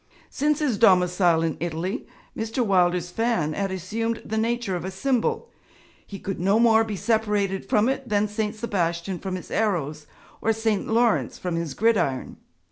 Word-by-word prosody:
Since 295 +1 +1
his 255 -9 0
domicile 180 -4 +4
in 165 -1 -1
Italy, 170 +3 -3 0.3
Mr. 225 +2 -1
Wilder's 180 -3 +2
fan 225 -8 0
had 195 +3 -1
assumed 225 +5 -3
the 220 - -3
nature 230 -3 0
of 175 - -4
a 190 - -3
symbol; 250 - -1 0.5
he 200 - -9
could 195 0 -5
no 195 +5 +3
more 225 -1 +5
be 220 -2 -4
separated 210 -3 0
from 210 +2 +3
it 265 -1 -2
than 210 0 +2
St. 210 0 -2
Sebastian 180 -5 -2
from 190 -1 -4
his 180 - -8
arrows 155 -8 -1 0.3
or 225 - +2
St. 220 -2 -1
Laurence 230 0 +2
from 180 -2 -3
his 165 -5 -3
gridiron. 205 - +1
200 Hz, 165 wpm, -24 LUFS, 180-225 Hz, 0.5 s, more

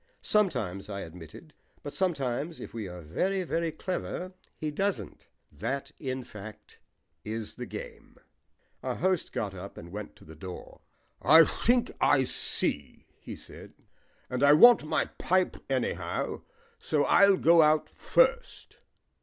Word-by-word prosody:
"Sometimes," 125 - 0
I 100 -1 -4
admitted. 85 - -11 0.3
"But 145 - -6
sometimes, 155 -4 -2
if - - -9
we 110 -4 -5
are 90 -1 -9
very, 185 - -1
very 165 -1 -1
clever, 185 +1 -4 0.2
he 155 -1 -3
doesn't. 195 +6 -3 0.2
That, 120 - -4
in 130 -2 -4
fact, 105 -1 -12 0.4
is 110 0 -4
the - - -7
game." - - -9 0.6
Our - - -3
host 185 -1 0
got 100 -3 -3
up 95 +1 -9
and 85 - -10
went 105 +1 -7
to - - -18
the 80 - -12
door. 90 +3 -10 0.4
"I 160 +5 +8
think 240 +8 +1
I 140 -2 +4
see," 75 - -2
he - - -8
said; - - -12 0.5
"and 125 0 -3
I 145 +1 +7
want 240 +8 +8
my 155 - 0
pipe 185 0 0
anyhow. 130 -2 -2 0.4
So 150 -2 0
I'll 200 +3 +5
go 170 -1 +6
out 155 0 +3
first." - - 0
145 Hz, 140 wpm, -29 LUFS, -, 0.6 s, I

